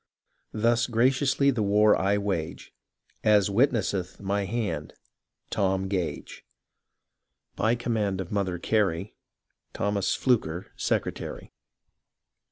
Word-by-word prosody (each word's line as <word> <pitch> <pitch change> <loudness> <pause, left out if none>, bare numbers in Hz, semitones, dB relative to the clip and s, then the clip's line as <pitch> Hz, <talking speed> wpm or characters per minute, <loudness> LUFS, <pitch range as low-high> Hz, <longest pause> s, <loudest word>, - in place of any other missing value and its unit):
— - - -46
Thus 115 +2 +2
graciously 130 +3 +2
the 120 -4 -2
war 105 +1 +4
I 100 +2 +1
wage, 95 -6 -3 0.5
As 105 -2 +4
witnesseth 100 -6 +1
my 100 0 -1
hand 105 -8 -3 0.3
— - - -49
Tom 95 0 0
Gage. 95 -4 -4 1.1
By 115 +2 +2
command 110 -5 -1
of 90 -2 -5
Mother 95 -4 -1
Gary, 95 -1 0 0.6
Thomas 100 -1 0
Flucker, 95 -9 0
Secretary. - - -3
100 Hz, 105 wpm, -27 LUFS, 95-115 Hz, 1.1 s, war